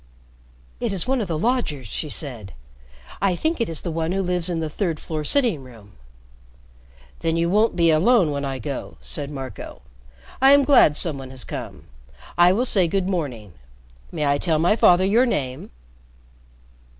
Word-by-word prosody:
"It -, -, -2 dB
is 190 Hz, +1 st, -4 dB
one 265 Hz, -1 st, +1 dB
of 205 Hz, -, -3 dB
the 165 Hz, -2 st, -2 dB
lodgers," 190 Hz, -, -1 dB
she 150 Hz, +9 st, -5 dB
said. 120 Hz, -, -5 dB, 0.7 s
"I 195 Hz, -2 st, +2 dB
think 315 Hz, -, -1 dB
it 230 Hz, -, 0 dB
is 165 Hz, -, -4 dB
the 170 Hz, -, -4 dB
one 165 Hz, +2 st, -2 dB
who 195 Hz, 0 st, 0 dB
lives 180 Hz, -1 st, -1 dB
in 170 Hz, -2 st, -2 dB
the 160 Hz, -, -2 dB
third 165 Hz, 0 st, -2 dB
floor 155 Hz, -2 st, -4 dB
sitting 230 Hz, -, +1 dB
room." 115 Hz, -5 st, -15 dB, 1.3 s
"Then 165 Hz, 0 st, -1 dB
you 170 Hz, +1 st, +1 dB
won't 215 Hz, +3 st, +2 dB
be 170 Hz, -2 st, +4 dB
alone 180 Hz, +1 st, +3 dB
when 140 Hz, 0 st, -3 dB
I 135 Hz, -1 st, -3 dB
go," 135 Hz, +2 st, -6 dB
said 145 Hz, -2 st, -6 dB
Marco. 135 Hz, -3 st, -8 dB, 0.6 s
"I 270 Hz, +1 st, +7 dB
am 285 Hz, 0 st, +6 dB
glad 265 Hz, -, +5 dB
some 150 Hz, -3 st, -1 dB
one 130 Hz, -1 st, -9 dB
has 130 Hz, -1 st, -7 dB
come. -, -, -7 dB, 0.5 s
I 175 Hz, +1 st, +6 dB
will 230 Hz, +7 st, +1 dB
say 190 Hz, -7 st, +3 dB
good 190 Hz, +2 st, -1 dB
morning. 130 Hz, -, -4 dB, 0.6 s
May 150 Hz, -, -2 dB
I 140 Hz, 0 st, +2 dB
tell 160 Hz, -1 st, +1 dB
my 175 Hz, +7 st, +3 dB
father 185 Hz, -4 st, +5 dB
your 230 Hz, +6 st, +3 dB
name?" 130 Hz, -, -3 dB
165 Hz, 180 wpm, -22 LUFS, 145-195 Hz, 1.3 s, I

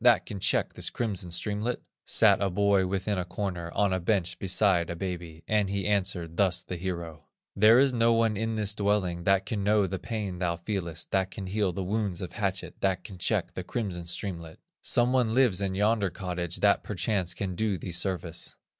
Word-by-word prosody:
That 120 Hz, -2 st, +5 dB
can 100 Hz, -, -6 dB
check 95 Hz, -1 st, +1 dB
this -, -, -3 dB
crimson 100 Hz, -7 st, -3 dB
streamlet?" 105 Hz, +7 st, -2 dB, 0.3 s
Sat -, -, +5 dB
a 100 Hz, -, +2 dB
boy 100 Hz, 0 st, +3 dB
within 95 Hz, +1 st, -1 dB
a -, -, 0 dB
corner, 90 Hz, -2 st, -4 dB
On 100 Hz, -2 st, +2 dB
a 95 Hz, -, +1 dB
bench 90 Hz, -1 st, 0 dB
beside 95 Hz, -2 st, +2 dB
a 85 Hz, -, -3 dB
baby, 85 Hz, -3 st, -5 dB
And 105 Hz, -2 st, +2 dB
he 100 Hz, -1 st, -2 dB
answered 90 Hz, -5 st, -1 dB
thus 90 Hz, -3 st, +2 dB
the 90 Hz, -, -5 dB
hero: 85 Hz, -3 st, -5 dB, 0.3 s
"There 110 Hz, +3 st, +7 dB
is 135 Hz, 0 st, +4 dB
no 115 Hz, -1 st, +3 dB
one 115 Hz, -1 st, +3 dB
in 110 Hz, +2 st, -1 dB
this 105 Hz, -1 st, 0 dB
dwelling 100 Hz, -5 st, 0 dB
That 95 Hz, 0 st, +3 dB
can 105 Hz, -3 st, -2 dB
know 105 Hz, 0 st, +3 dB
the 95 Hz, 0 st, -3 dB
pain 100 Hz, -3 st, -4 dB
thou 85 Hz, -2 st, 0 dB
feelest, 85 Hz, -2 st, -4 dB
That 95 Hz, -1 st, +1 dB
can 95 Hz, -, -7 dB
heal 100 Hz, 0 st, 0 dB
the 95 Hz, +2 st, -4 dB
wounds 100 Hz, -2 st, -1 dB
of 90 Hz, -2 st, -5 dB
hatchet, 95 Hz, -2 st, -2 dB
That 95 Hz, -2 st, +1 dB
can 95 Hz, -4 st, -10 dB
check -, -, 0 dB
the 90 Hz, -, -5 dB
crimson 90 Hz, -4 st, -4 dB
streamlet; 85 Hz, -2 st, -4 dB, 0.2 s
Some 120 Hz, +1 st, +2 dB
one 120 Hz, -3 st, +2 dB
lives 125 Hz, -8 st, +4 dB
in 95 Hz, -1 st, -1 dB
yonder 105 Hz, 0 st, +2 dB
cottage, 90 Hz, -2 st, -4 dB
That 100 Hz, -1 st, +4 dB
perchance 95 Hz, -2 st, -1 dB
can 95 Hz, -2 st, -3 dB
do 105 Hz, +1 st, 0 dB
thee 90 Hz, +2 st, -6 dB
service." 90 Hz, -1 st, -2 dB
95 Hz, 200 wpm, -28 LUFS, 90-105 Hz, 0.3 s, There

